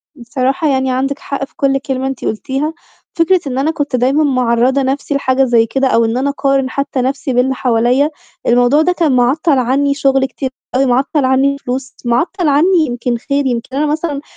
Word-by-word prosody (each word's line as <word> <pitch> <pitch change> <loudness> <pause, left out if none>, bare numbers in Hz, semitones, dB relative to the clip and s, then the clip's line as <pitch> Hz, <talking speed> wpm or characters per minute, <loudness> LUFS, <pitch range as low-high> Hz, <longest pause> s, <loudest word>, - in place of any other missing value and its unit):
بصراحة 265 +4 -1
يعني 265 -1 +1
عندِك 275 +2 -1
حق 275 -1 -4
في 295 - -32
كل 275 -1 +1
كلمة 265 -1 -3
أنتِ 270 -1 -5
قُلتيها، 270 +8 -2 0.4
فكرة 345 +2 +3
إن 260 -1 -3
أنا 295 +4 +1
كنت 290 -4 -2
دايمًا 265 +5 +2
معرّضة 255 0 +2
نَفْسي 275 +2 -2
لحاجة 270 -1 +1
زي 235 -3 +3
كده 265 +4 0
أو 230 -2 +2
إن 225 +2 -1
أنا 275 +2 0
أقارن 275 -2 0
حتى 275 -2 -2
نَفْسي 265 +1 -2
باللي 255 +2 +2
حواليّا، 250 +4 +2 0.4
الموضوع 245 +5 +4
ده 360 +3 +2
كان 330 -5 +1
معطّل 275 +4 +2
عني 275 +3 +1
شغلي 270 -1 +1
كتير 265 0 -5 0.3
أوي، 270 +1 +3
معطّل 265 +3 +1
عني 270 +2 +2
فلوس، 260 0 -5
معطّل 320 - 0
عني 325 +7 +3
يمكن 240 0 -2
خير، 280 +3 -2
يمكن 250 +1 -3
أنا 300 - +1
مثلًا 300 -1 -2
270 Hz, 190 wpm, -15 LUFS, 255-285 Hz, 0.4 s, الموضوع